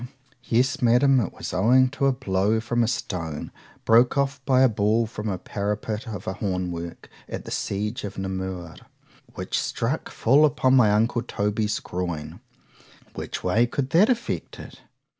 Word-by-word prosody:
—Yes, 125 +3 +1
Madam, 125 +3 +4
it 105 - -1
was - - -7
owing 125 +8 +4
to 140 0 0
a - - +4
blow 110 -4 0
from 120 +1 0
a - - +1
stone, 85 -10 -4 0.3
broke 120 +4 +4
off 140 -1 0
by 130 -1 +4
a 130 - +7
ball 110 +1 +1
from 110 -1 -6
the 95 -3 -1
parapet 105 +4 -3
of 105 -5 -6
a 95 - -2
horn 90 -3 -2
work 85 0 -7 0.2
at - - -6
the - - -8
siege 105 +4 -3
of 100 -2 -6
Namur, 95 -3 -5 0.6
which - - -2
struck - - -2
full 140 +6 +3
upon 130 -3 +3
my 115 -5 +5
uncle 115 +3 +2
Toby's 105 -2 -1
groin.—Which 85 -4 -8
way 110 +7 +3
could 135 +2 -3
that 195 +8 +5
effect 245 0 -2
it? - - -11
110 Hz, 160 wpm, -24 LUFS, 95-130 Hz, 0.6 s, a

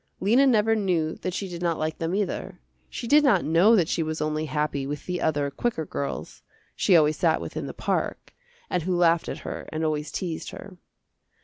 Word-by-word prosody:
Lena 240 +8 +4
never 225 -2 +3
knew 175 -7 0
that 185 - -3
she 195 - -3
did 175 -1 -7
not 170 -2 0
like 155 0 -3
them 165 +3 -1
either. 200 -2 -3 0.3
She - - -6
did 295 +5 +5
not 225 - +3
know 175 +9 +5
that 175 -7 +3
she 165 - 0
was 155 0 -2
only 155 0 -1
happy 150 -2 -1
with 145 0 -5
the 180 -1 -3
other 145 -2 0
quicker 225 -3 -2
girls, 70 - -5 0.3
she 185 - +4
always 155 -1 +3
sat 160 -2 +2
with - - -7
in - - -3
the - - -6
park, - - -2 0.3
and 180 - -1
who 180 +2 -1
laughed 170 -1 +3
at - - -4
her - - -6
and 155 +1 -2
always 155 -1 -2
teased 170 -4 -4
her. 195 -2 -10
165 Hz, 210 wpm, -25 LUFS, 155-195 Hz, 0.3 s, did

